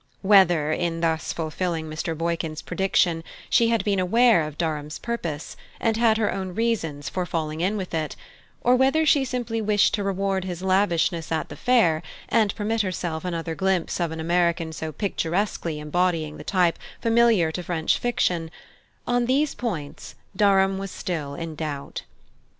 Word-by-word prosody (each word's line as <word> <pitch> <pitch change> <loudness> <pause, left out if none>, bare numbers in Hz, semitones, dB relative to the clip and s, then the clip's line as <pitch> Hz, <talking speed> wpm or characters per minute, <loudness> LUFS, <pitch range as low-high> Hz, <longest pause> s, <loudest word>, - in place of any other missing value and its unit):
Whether, 175 -6 +5
in 165 0 -1
thus 160 -1 0
fulfilling 165 0 -3
Mr. 155 +1 -4
Boykin's 165 -1 -2
prediction, 175 -3 +1 0.3
she 230 - +5
had 230 -1 +1
been 200 -2 +1
aware 225 +2 +4
of 150 -1 -5
Durham's 150 -2 -2
purpose, 170 -11 -4 0.2
and 225 -1 +1
had 225 -1 +3
her 220 -2 +1
own 190 -2 -4
reasons 180 -11 -1
for 185 - -2
falling 160 -2 -3
in 195 +4 +1
with 185 -3 -5
it; 155 -2 -2 0.5
or 245 +1 +4
whether 270 +5 +3
she 285 -2 +4
simply 240 -3 -2
wished 210 -1 +3
to 205 - 0
reward 195 -1 -1
his 180 -1 -5
lavishness 185 -3 +1
at 160 -1 -1
the - - -8
fair, 220 -11 +3 0.3
and 215 -4 +2
permit 220 +1 0
herself 175 -4 -3
another 170 -2 -3
glimpse 190 -1 0
of 170 -2 0
an 160 - -5
American 170 0 +1
so 160 0 -5
picturesquely 175 -2 -2
embodying 160 0 0
the - - -9
type 180 -4 +1 0.2
familiar 230 -7 +3
to 180 - -4
French 170 -2 0
fiction 180 -9 0 0.6
on 245 0 +1
these 280 +3 +2
points 170 -13 -5 0.2
Durham 195 -1 +3
was 195 0 -4
still 155 -6 -4
in 165 +1 -5
doubt. 145 -2 -5
180 Hz, 160 wpm, -24 LUFS, 160-210 Hz, 0.6 s, Whether